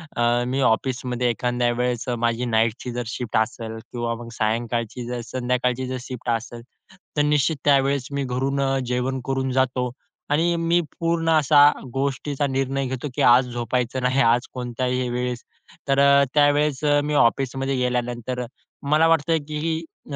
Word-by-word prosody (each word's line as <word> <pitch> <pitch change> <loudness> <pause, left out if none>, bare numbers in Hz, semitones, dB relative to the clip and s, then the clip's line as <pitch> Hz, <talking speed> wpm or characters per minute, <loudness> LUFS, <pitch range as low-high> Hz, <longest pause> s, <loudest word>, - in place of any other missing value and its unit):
अ, 120 +1 +2
मी 130 +2 -1
ऑफिसमध्ये 125 +1 -1
एखाद्या 120 +1 0
वेळेस 120 0 -2
माझी 115 +1 0
नाईटची 115 +1 0
जर 120 0 -3
शिफ्ट 120 -1 -3
असेल 110 0 -2
किंवा 120 -1 -2
मग 115 - -9
सायंकाळची, 115 +2 -2
जर 120 0 -4
संध्याकाळची 125 0 -1
जर 130 - -3
शिफ्ट 125 -2 -6
असेल, 115 +1 -3 0.6
तर - - +4
निश्चित 150 +1 +2
त्यावेळेस 140 -2 +3
मी 140 0 -2
घरून 135 +2 -1
अ, 135 0 +1
जेवण 125 +2 -1
करून 135 -1 -1
जातो 125 -1 0 0.4
आणि 170 +3 +2
मी 170 +1 +2 0.2
पूर्ण 165 -1 0
असा 150 -2 +5 0.3
गोष्टीचा 140 +1 -1
निर्णय 135 0 -1
घेतो 130 +2 -4
की - - -1
आज 125 +1 +6
झोपायचं 120 +2 -2
नाही, 130 +2 +2
आज 120 +2 +3
कोणत्याही 125 0 -2
वेळेस. 125 0 -3 0.4
तर 135 0 +2 0.3
त्यावेळेस 145 -1 +2
अ, 145 -1 +4
मी 150 +1 -2
ऑफिसमध्ये 135 +1 +1
गेल्यानंतर 125 0 -2 0.5
मला 155 +2 +5
वाटतं 165 0 +3
की 160 +2 -2 0.3
अ, - - -2
125 Hz, 150 wpm, -23 LUFS, 120-140 Hz, 0.6 s, आज